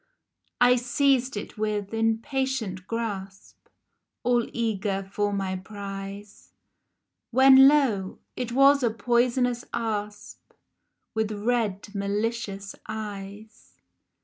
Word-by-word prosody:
I 250 0 +6
seized 255 0 +1
it, 205 - -7
with 210 -1 -2
impatient 225 -3 -1
grasp, 200 -4 -6 0.6
All 240 -1 +1
eager 205 -4 -1
for 205 0 0
my 195 -1 -2
prize, 200 +1 -9 0.8
When, 265 +2 +8
lo! 245 -10 +2 0.2
it 245 -2 -4
was 275 +3 +5
a 240 - +2
poisonous 240 +1 +1
asp 210 -3 -5 0.6
With 220 -1 -1
red 210 -2 -1
malicious 200 0 -3
eyes 210 0 -8
220 Hz, 95 wpm, -26 LUFS, 200-245 Hz, 0.8 s, When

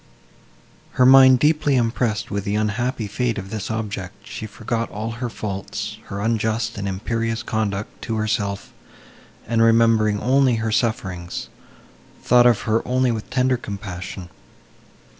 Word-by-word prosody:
Her 125 - +4
mind 130 0 +8
deeply 150 0 +2
impressed 115 -2 0
with 100 -1 -2
the 100 0 -2
unhappy 110 +3 -1
fate 115 +3 -1
of 95 0 -6
this 105 -3 -4
object, 105 -3 -5
she 110 - -6
forgot 115 +2 -3
all 110 +2 -4
her 120 +2 -4
faults, 105 +1 -5
her 100 0 -5
unjust 110 0 0
and 100 - -3
imperious 115 +4 -2
conduct 105 -3 -3
to 115 - -2
herself; 105 -2 -2 0.7
and, 115 -1 +1
remembering 115 -2 +4
only 130 +2 +3
her 110 0 -2
sufferings, 95 -7 -2 0.7
thought 125 0 +6
of 120 -4 +3
her 110 +1 +1
only 130 0 +1
with 110 -2 -5
tender 130 0 +1
compassion. 95 -4 -7
110 Hz, 140 wpm, -22 LUFS, 105-120 Hz, 0.7 s, mind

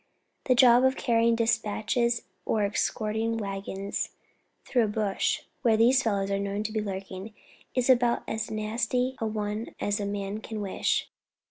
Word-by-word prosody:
The 255 - +4
job 245 0 +7
of 260 0 +4
carrying 230 -1 +3
despatches 230 +1 +1 0.2
or 215 -2 +1
escorting 220 +2 0
waggons 195 -1 -3 0.6
through 245 -4 +2
a - - -1
bush 210 -2 0 0.2
where 230 -4 +4
these 250 +4 +5
fellows 200 -4 0
are 200 - +1
known 200 +1 -2
to 215 - -3
be 215 - 0
lurking, 195 +1 -6 0.4
is 255 -1 +1
about 245 -2 +4
as 220 -1 -3
nasty 230 +4 -1
a 225 - -1
one 210 +1 -3
as 205 +1 0
a 200 - -2
man 200 +1 -3
can 220 0 -6
wish. 200 -2 0
220 Hz, 155 wpm, -28 LUFS, 205-235 Hz, 0.6 s, job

